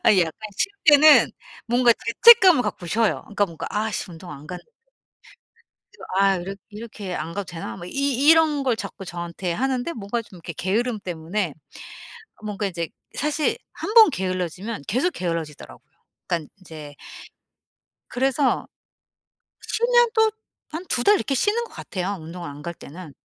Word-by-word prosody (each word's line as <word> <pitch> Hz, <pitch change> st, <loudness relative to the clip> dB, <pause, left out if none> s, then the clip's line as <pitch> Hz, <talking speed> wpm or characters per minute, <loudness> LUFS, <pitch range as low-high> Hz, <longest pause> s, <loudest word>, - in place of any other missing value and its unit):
아 -, -, +7 dB
약간 165 Hz, -3 st, +2 dB, 0.2 s
쉴 385 Hz, -, +1 dB, 0.2 s
때는 300 Hz, 0 st, +7 dB, 0.4 s
뭔가 240 Hz, 0 st, +4 dB, 0.3 s
죄책감을 380 Hz, -, +9 dB
갖고 175 Hz, -, -5 dB
쉬어요. 220 Hz, +4 st, +1 dB
그러니까 205 Hz, -1 st, -1 dB
뭔가 165 Hz, -2 st, -7 dB
'아 215 Hz, +1 st, -1 dB
씨 205 Hz, -, -4 dB
운동 170 Hz, +1 st, -11 dB
안 145 Hz, +1 st, -11 dB
갔는데' 180 Hz, -, -9 dB, 1.2 s
그래서 -, -, -13 dB
'아 195 Hz, -1 st, +4 dB
이렇 185 Hz, +3 st, -5 dB, 0.2 s
이렇게 210 Hz, -3 st, -7 dB
안 165 Hz, -, -4 dB
가도 200 Hz, -, -3 dB
되나?' 170 Hz, -1 st, -7 dB
뭐 175 Hz, -1 st, -9 dB
이 -, -, -9 dB
이 275 Hz, 0 st, 0 dB
이런 315 Hz, -3 st, +5 dB
걸 250 Hz, -4 st, +1 dB
자꾸 195 Hz, -3 st, -7 dB
저한테 175 Hz, +1 st, -4 dB
하는데 260 Hz, -, -1 dB
뭔가 230 Hz, +2 st, -4 dB
좀 190 Hz, -, -16 dB
이렇게 170 Hz, 0 st, -7 dB
게으름 220 Hz, +5 st, -1 dB
때문에 175 Hz, -1 st, -3 dB, 0.9 s
뭔가 205 Hz, -1 st, -3 dB
이제 170 Hz, -3 st, -3 dB, 0.3 s
사실 300 Hz, +1 st, 0 dB, 0.2 s
1 425 Hz, -, -5 dB
번 445 Hz, -6 st, +9 dB
게을러지면 185 Hz, -, -3 dB
계속 265 Hz, -, +1 dB
게을러지더라고요. 165 Hz, -4 st, -5 dB, 0.5 s
그러니까 165 Hz, -3 st, -2 dB
인제 155 Hz, -5 st, -11 dB, 1.1 s
그래서 265 Hz, +1 st, +1 dB, 1.0 s
쉬면 480 Hz, 0 st, +3 dB
또 445 Hz, -1 st, +4 dB, 0.4 s
한 335 Hz, +4 st, -6 dB
2 240 Hz, -, 0 dB
달 415 Hz, -, +6 dB
이렇게 280 Hz, -, -1 dB
쉬는 430 Hz, -, +1 dB
것 -, -, -11 dB
같아요 195 Hz, +1 st, -4 dB
운동을 170 Hz, +1 st, -8 dB
안 145 Hz, +1 st, -10 dB
갈 170 Hz, +2 st, -6 dB
때는. 160 Hz, +1 st, -11 dB
205 Hz, 315 characters per minute, -23 LUFS, 175-275 Hz, 1.2 s, 죄책감을